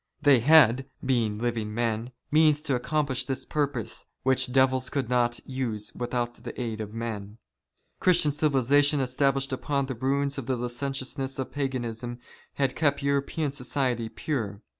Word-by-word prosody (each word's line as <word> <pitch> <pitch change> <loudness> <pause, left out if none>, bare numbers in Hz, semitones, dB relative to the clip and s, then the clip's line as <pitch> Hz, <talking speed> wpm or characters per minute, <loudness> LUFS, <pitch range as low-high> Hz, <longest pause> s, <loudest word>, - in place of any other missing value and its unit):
They 145 -4 +5
had, 135 -1 +6 0.2
being 115 -5 +1
living 110 -2 -2
men, 115 0 -1 0.2
means 150 -1 +4
to 145 - 0
accomplish 135 +1 0
this 135 -1 -3
purpose, 145 -6 -2 0.2
which 130 -1 +2
devils 130 0 +3
could 135 -4 -2
not 120 -1 +2
use 115 -6 -3
without 120 0 -3
the - - -7
aid 115 -3 -3
of 105 -1 -6
men. 110 -2 -5 0.6
Christian 175 -5 +4
civilization 145 0 +3
established 135 +1 +1
upon 140 +1 -1
the 130 - -4
ruins 140 +3 0
of 125 - -7
the 130 - +1
licentiousness 130 +2 -3
of 130 - -4
Paganism 120 -4 -3 0.4
had 135 -2 0
kept 145 -2 +1
European 140 +1 0
society 125 -4 -1
pure. 110 -7 -3
130 Hz, 145 wpm, -27 LUFS, 120-140 Hz, 0.6 s, had